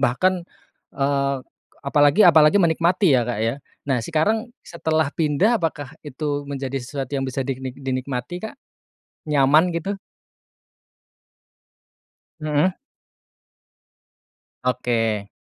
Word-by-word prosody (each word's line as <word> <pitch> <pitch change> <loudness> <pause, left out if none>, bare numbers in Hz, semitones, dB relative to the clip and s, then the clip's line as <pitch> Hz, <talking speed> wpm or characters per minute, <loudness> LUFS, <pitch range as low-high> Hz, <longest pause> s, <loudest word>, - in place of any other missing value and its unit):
bahkan, 175 +8 +1 0.5
eee, 140 0 +1 0.5
apalagi 145 +7 +4
apalagi 155 +1 +6
menikmati 170 +1 +3
ya, 125 -2 +4
Kak, 120 - -2
ya. 115 +3 0 0.3
Nah, 135 -3 0
sekarang 210 - 0 0.2
setelah 160 -3 -1
pindah, 170 +9 +2
apakah 145 -3 -3
itu 145 0 -4
menjadi 135 -1 -3
sesuatu 135 +1 -6
yang 135 -1 -1
bisa 130 +1 -3
diknik 130 -1 -5
dinikmati, 130 +3 -4
Kak? - - -14 0.7
Nyaman 150 +4 +4
gitu? 195 +4 -3 2.4
Mhm. 155 +4 +1 1.9
Oke. 115 -5 0
145 Hz, 95 wpm, -22 LUFS, 130-165 Hz, 2.4 s, apalagi